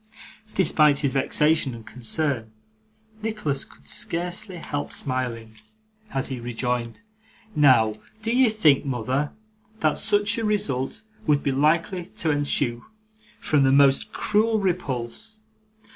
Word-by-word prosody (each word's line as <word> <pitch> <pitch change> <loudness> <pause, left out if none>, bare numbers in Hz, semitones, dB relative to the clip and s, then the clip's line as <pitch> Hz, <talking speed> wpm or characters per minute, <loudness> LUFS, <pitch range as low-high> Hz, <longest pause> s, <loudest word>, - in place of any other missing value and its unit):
Despite 150 -6 +4
his 140 -3 0
vexation 150 0 +2
and 115 -1 -11
concern, 125 -1 -2 0.7
Nicholas 210 -11 -2
could - - -17
scarcely 180 +3 -1
help 145 -3 -4
smiling, 120 -4 -3 0.5
as 135 -9 -2
he 130 -2 -4
rejoined, 120 - -3 0.5
'Now, 120 -7 +5 0.3
do 230 +2 0
you 255 -2 +5
think, 160 -11 +3
mother, 130 +2 -1 0.5
that 155 -1 +2
such 205 +1 +1
a - - -2
result 205 -13 -1 0.2
would 145 -2 +3
be 140 - +1
likely 165 +6 +1
to 160 -4 -2
ensue 140 -4 0 0.6
from 150 -2 +2
the 135 -1 +4
most 135 0 +4
cruel 220 +1 +1
repulse? 180 - -3
145 Hz, 120 wpm, -24 LUFS, 130-180 Hz, 0.7 s, Now